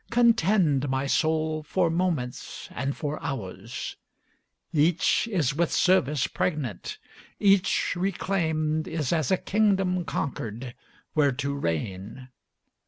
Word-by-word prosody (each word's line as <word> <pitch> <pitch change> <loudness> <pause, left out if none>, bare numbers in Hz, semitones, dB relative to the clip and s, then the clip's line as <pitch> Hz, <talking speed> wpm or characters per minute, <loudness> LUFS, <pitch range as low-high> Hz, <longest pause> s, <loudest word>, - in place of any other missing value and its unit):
Contend, 195 - +3
my 130 +1 0
soul, 155 +2 +1
for 170 +2 +1
moments 165 -8 -2
and 140 +1 -3
for 150 0 -3
hours; 110 -3 -5 0.8
Each 165 +8 +3
is 175 - +1
with 170 +3 0
service 150 -7 +3
pregnant; 145 - -2 0.4
each 195 -3 +3
reclaimed 160 -4 0
Is 155 -2 -1
as 155 -6 +1
a 190 - +3
kingdom 195 -4 +1
conquered, 120 -3 -4 0.4
where 145 -3 +3
to 140 +2 -2
reign. 100 - -4
155 Hz, 105 wpm, -26 LUFS, 135-180 Hz, 0.8 s, Contend